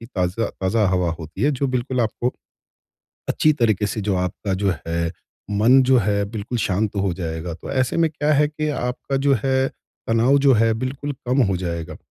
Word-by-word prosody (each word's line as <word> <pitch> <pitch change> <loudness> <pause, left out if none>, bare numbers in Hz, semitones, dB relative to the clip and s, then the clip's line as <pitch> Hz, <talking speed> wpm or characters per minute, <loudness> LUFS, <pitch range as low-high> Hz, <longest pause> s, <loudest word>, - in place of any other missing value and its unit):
ताज़ा 95 +4 0
ताज़ा 105 +3 +2
हवा 90 -2 +1
होती 80 +4 -8
है 145 - +4
जो 140 0 -1
बिल्कुल 130 0 -1
आपको, 115 +2 -1 1.0
अच्छी 155 - +3
तरीके 110 -7 +1
से 110 - -3
जो 100 -2 0
आपका 90 +2 -2
जो 100 - +3
है 85 0 -1 0.4
मन 115 +6 +5
जो 130 0 +4
है 100 -2 +1
बिल्कुल 115 +2 -4
शांत 105 0 0
हो 100 -2 +1
जाएगा। 80 -1 -4
तो - - -9
ऐसे 130 -2 0
में 165 -1 +3
क्या 150 0 0
है 150 0 +4
कि 155 0 -3
आपका 135 0 -2
जो 140 +1 +3
है 130 0 +2 0.4
तनाव 115 +5 +4
जो 140 -1 +5
है 115 0 +3
बिल्कुल 135 +4 -4
कम 130 +3 +2
हो 95 - +1
जाएगा। 85 -3 -4
115 Hz, 190 wpm, -22 LUFS, 95-135 Hz, 1.0 s, मन